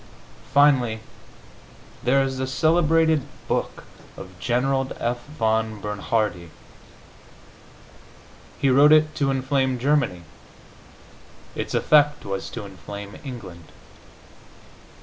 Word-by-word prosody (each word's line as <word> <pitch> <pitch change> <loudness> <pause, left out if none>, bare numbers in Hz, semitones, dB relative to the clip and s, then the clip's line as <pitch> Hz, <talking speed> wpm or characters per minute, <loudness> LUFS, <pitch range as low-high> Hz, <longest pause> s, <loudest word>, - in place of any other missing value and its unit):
Finally, 130 -6 +4 1.0
there 135 +2 +3
is 135 -1 -3
the 130 - -2
celebrated 160 +2 +2 0.3
book - - -2 0.3
of 95 - -9
General 135 +4 0
F. 120 +1 -2
von 110 -6 -1
Bernhardi. 105 -3 -2 2.1
He 135 - +2
wrote 145 +3 +6
it 155 0 +5
to 140 -2 0
inflame 130 -1 0
Germany; 125 - 0 1.3
its - - -4
effect 150 -1 +3
was 95 -1 -4
to 115 -3 -7
inflame 100 +2 -9
England.... 95 - -9
130 Hz, 90 wpm, -23 LUFS, 110-145 Hz, 2.1 s, wrote